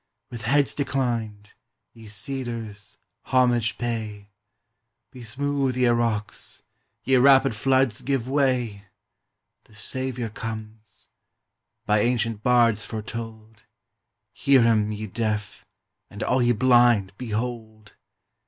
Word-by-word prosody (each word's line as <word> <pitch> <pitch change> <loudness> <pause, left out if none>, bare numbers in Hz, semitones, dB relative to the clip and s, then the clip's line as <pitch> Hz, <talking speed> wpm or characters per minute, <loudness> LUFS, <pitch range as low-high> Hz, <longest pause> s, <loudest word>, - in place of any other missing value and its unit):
With 120 -2 -7
heads 140 +5 +2
declined, 120 -7 -2 0.4
ye 115 -1 -13
cedars, 110 -2 -5 0.3
homage 120 -3 +2
pay! 110 -4 -4 0.8
Be 125 - -11
smooth, 135 +2 -1
ye 125 - +3
rocks! 115 -3 -1 0.4
ye 130 0 +3
rapid 135 -1 +5
floods, 130 -1 +1
give 135 -3 -1
way! 125 -7 0 0.8
The 110 - -20
Saviour 125 +1 -4
comes! 110 -1 -8 0.8
by 105 0 +3
ancient 115 -1 0
bards 115 -3 +3
foretold: 110 -1 -8 0.7
Hear 135 -3 +4
him, 110 -2 +2
ye 105 +1 -5
deaf! 105 -1 -3 0.4
and 105 - -6
all 130 0 +2
ye 120 0 +3
blind, 120 -4 +4
behold! 110 -2 -5
115 Hz, 105 wpm, -24 LUFS, 105-125 Hz, 0.8 s, rapid